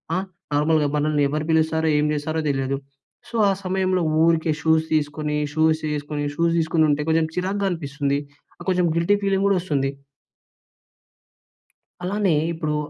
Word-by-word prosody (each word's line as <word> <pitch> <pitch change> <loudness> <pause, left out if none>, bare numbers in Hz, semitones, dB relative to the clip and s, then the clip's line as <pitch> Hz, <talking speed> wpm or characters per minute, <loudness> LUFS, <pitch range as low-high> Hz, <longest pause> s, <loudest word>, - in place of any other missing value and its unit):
ఆహ్, 190 +2 -2 0.3
నార్మల్‌గా 150 0 +2
మనల్ని 150 0 +1
ఎవరు 155 +1 -2
పిలుస్తారో, 160 0 +2
ఏం 150 - +2
చేస్తారో 155 +2 -2
తెలియదు. 135 0 -1 0.5
సో, 235 - -8
ఆ - - +3
సమయంలో 185 0 +1 0.2
ఊరికే 165 -1 +2
షూస్ 160 0 +3
తీసుకొని, 150 0 -1 0.2
షూస్ 160 0 +2
వేసుకొని, 145 0 -3
షూస్ 170 0 +1
తీసుకొని 160 0 +2
ఉంటే 145 +1 0
కొంచెం 160 0 +2
చిరాగ్గా 195 +2 -1
అనిపిస్తుంది. 140 -3 -2 0.5
కొంచెం 180 -1 +2
గిల్టీ 170 +5 +3
ఫీలింగ్ 195 -1 +1
కూడా 200 - +3
వస్తుంది. 140 -6 -1 2.1
అలానే, 195 -1 +1 0.2
ఇప్పుడు 155 -2 -2
160 Hz, 135 wpm, -23 LUFS, 150-175 Hz, 2.1 s, ఆ